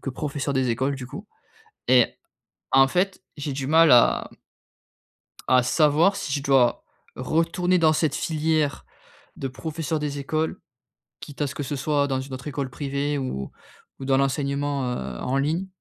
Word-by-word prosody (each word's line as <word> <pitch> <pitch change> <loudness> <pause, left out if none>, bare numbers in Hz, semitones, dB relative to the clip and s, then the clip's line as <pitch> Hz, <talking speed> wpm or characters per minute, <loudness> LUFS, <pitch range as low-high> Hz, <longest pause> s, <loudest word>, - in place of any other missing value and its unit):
que 135 - -3
professeur 140 +1 -3
des 130 -1 +1
écoles, 130 +4 0
du 130 -2 -7
coup 200 - -9 0.6
et 125 -2 +4 0.6
en 135 0 +6
fait, 185 +6 -1 0.2
j'ai 145 -1 -3
du 135 0 -4
mal 160 +1 +5
à 120 - +4 1.2
à 130 -1 +5
savoir 155 +8 +3
si 140 - -4
je 140 0 -1
dois 135 -3 +3 0.3
retourner 165 +7 +1
dans 160 -2 +4
cette 155 -2 0
filière 155 -3 0 0.5
de 135 - -4
professeur 155 +4 -4
des 145 -1 -3
écoles, 155 +3 -2 0.6
quitte 145 0 -7
à - - +2
ce 140 - -6
que 145 - -4
ce 140 +1 -4
soit 145 +1 +1
dans 130 -1 -1
une 135 0 -9
autre 130 +3 -7
école 140 -2 -3
privée 140 +2 -2
ou 65 - -4 0.5
ou 135 - -5
dans 135 - +3
l'enseignement, 140 0 0
heu, 65 - -5
en 130 - -1
ligne. 155 +7 0
140 Hz, 165 wpm, -24 LUFS, 130-155 Hz, 1.2 s, en